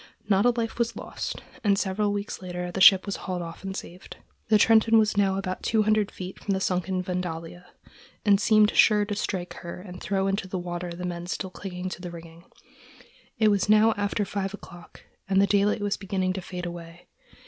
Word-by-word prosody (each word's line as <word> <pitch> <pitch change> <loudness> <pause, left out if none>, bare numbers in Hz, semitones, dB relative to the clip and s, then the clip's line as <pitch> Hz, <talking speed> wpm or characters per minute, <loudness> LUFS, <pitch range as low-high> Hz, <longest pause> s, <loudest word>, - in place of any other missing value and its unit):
Not 200 +2 +3
a - - +6
life 230 -1 -2
was 235 0 0
lost, - - -6 0.2
and 200 -2 +3
several 205 +2 0
weeks 205 -1 -4
later 180 -1 -5
the 190 - -3
ship 190 0 +8
was 200 - -3
hauled 180 -2 -4
off 165 +2 -9
and 195 0 -4
saved. 180 +2 -10 0.3
The 215 - +5
Trenton 225 +1 +5
was 215 -2 +3
now 195 -1 +2
about 185 -1 -4
two 220 -2 +2
hundred 215 -1 +2
feet 185 0 -8
from 200 - 0
the - - -1
sunken 185 0 -1
Vandalia, 175 -1 -5 0.6
and 200 -1 +4
seemed 215 -1 +5
sure 210 -1 +5
to 205 - -3
strike 185 -3 -3
her 170 +1 -7
and 180 -1 -10
throw 195 -1 0
into 195 0 -1
the 185 - -4
water 175 0 -4
the 175 +1 -6
men 175 -1 -5
still 190 +1 -4
clinging 185 -1 -6
to 180 - -8
the 180 - -6
rigging. 170 0 -12 0.9
It 220 -2 +4
was 200 0 +1
now 215 +1 +5
after 205 0 -1
five 195 +1 -3
o'clock, 175 -3 -14 0.3
and 190 0 +3
the 200 - +5
daylight 205 +1 +2
was 205 -1 -1
beginning 185 -1 -1
to 190 - -5
fade 180 0 -6
away. 170 0 -9
190 Hz, 205 wpm, -26 LUFS, 180-205 Hz, 0.9 s, ship